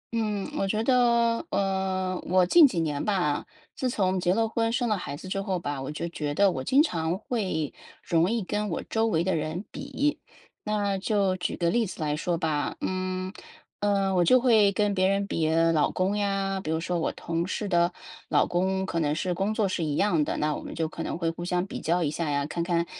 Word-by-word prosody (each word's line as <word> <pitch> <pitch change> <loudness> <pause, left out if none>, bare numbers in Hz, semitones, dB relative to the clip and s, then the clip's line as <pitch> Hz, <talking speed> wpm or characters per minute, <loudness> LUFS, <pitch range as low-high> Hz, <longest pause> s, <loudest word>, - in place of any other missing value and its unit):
嗯， 210 -3 -1
我 195 - +1
觉 215 +3 0
得， 235 0 +3
呃， 190 -1 -1
我 185 +1 +4
近 305 - +7
几 190 -10 -2
年 150 -3 -2
吧， 180 -8 0 0.3
自 260 - -1
从 190 -5 0
结 175 0 +1
了 225 +1 +2
婚 225 0 0
生 245 +1 0
了 215 - +2
孩 145 -7 -5
子 185 - -10
之 195 +1 -2
后 190 -1 -1
吧， 145 -5 -4
我 135 - -5
就 150 +3 -4
觉 150 -3 -3
得 200 +2 +4
我 130 -6 -4
经 275 - +4
常 170 - -1
会 190 - -2 0.3
容 170 +1 +2
易 230 -1 0
跟 210 +3 -2
我 165 - -3
周 225 0 0
围 165 -7 +1
的 190 -1 0
人 160 +5 -3
比。 285 +2 -2 0.5
那 205 -2 0
就 200 -2 +1
举 180 - -3
个 170 -1 +1
例 235 0 +1
子 185 - -9
来 150 -2 0
说 170 +2 -1
吧， 155 -3 -1
嗯， 185 0 -2 0.5
呃， 200 -1 +1
我 180 -1 +3
就 255 +9 +5
会 220 -5 +5
跟 205 0 +1
别 185 -1 +2
人 195 +1 +1
比 160 -5 0
老 165 -1 +3
公 190 +3 0
呀， 195 -1 -1
比 - - -5
如 160 0 0
说 175 +1 -2
我 - - 0
同 170 +1 -3
事 210 - -3
的 175 -2 +2 0.4
老 - - +4
公 190 +2 0
可 170 -3 -2
能 150 -2 +1
是 180 +3 -1
工 195 +4 -1
作 215 -2 +2
是 185 -2 -2
一 150 -2 -1
样 170 -4 +2
的， - - -2
那 150 0 0
我 - - -6
们 - - -8
就 165 -1 -1
可 165 - -7
能 - - -3
会 165 -1 0
互 175 - -7
相 180 +1 0
比 - - -7
较 175 +2 +1
一 145 - 0
下 155 0 -2
呀， 145 -1 0
看 170 +3 -3
看， 170 -1 +1
185 Hz, 245 characters per minute, -27 LUFS, 165-205 Hz, 0.5 s, 近